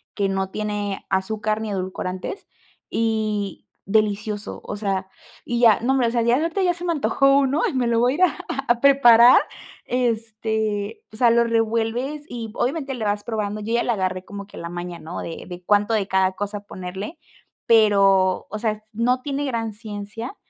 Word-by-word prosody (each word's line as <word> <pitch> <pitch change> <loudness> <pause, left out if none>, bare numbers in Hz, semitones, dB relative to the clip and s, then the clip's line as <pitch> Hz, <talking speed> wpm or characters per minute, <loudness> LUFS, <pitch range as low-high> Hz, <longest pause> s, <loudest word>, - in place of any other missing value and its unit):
que 200 -1 0
no 190 0 -1
tiene 210 -1 -3
azúcar 215 +3 -1
ni 220 - -4
edulcorantes 185 - -4 0.4
y 215 -3 -1 0.2
delicioso, 210 0 -1
o - - -4
sea, 195 -2 -2 0.4
y 240 -1 -1
ya, 230 -4 +6
no 255 +3 +2
hombre, 245 -4 +2
ya 235 0 +2
ahorita 330 +6 -1
ya 355 -1 +3
se 350 +1 -7
me 345 - +1
antojó 275 -2 +3
uno 280 +3 +1
y - - -3
me 255 -2 +1
lo 235 -1 +2
voy 245 +2 +3
a - - -2
ir 345 - -3
a - - +8 0.2
a - - -3
a 235 - -13
preparar, 245 -3 +7 0.4
este, 220 -3 -1
o 215 - -12
sea, 235 0 +5
lo 235 0 +4
revuelves 230 +5 -1
y 230 -3 -6
obviamente 270 +3 -2
le 240 -4 -5
vas 205 0 -1
probando. 215 -2 -3
Yo 220 +2 -3
ya 235 - +2
la 240 - +1
agarré 185 -2 -2
como 200 -1 -8
que 205 - -14
la 170 - -6
maña, 175 0 -6
¿no?, 165 +3 -6
de 165 - -7
de 180 0 -9
cuánto 205 +3 +3
de 200 -3 0
cada 190 -1 +2
cosa 205 +2 -4
ponerle 190 - -7 0.5
pero, 195 -4 +4
o 215 - -4
sea, 215 -1 -2
no 245 +3 +1
tiene 285 0 -2
gran 230 -4 -2
ciencia, 210 - -7
220 Hz, 185 wpm, -22 LUFS, 200-240 Hz, 0.5 s, a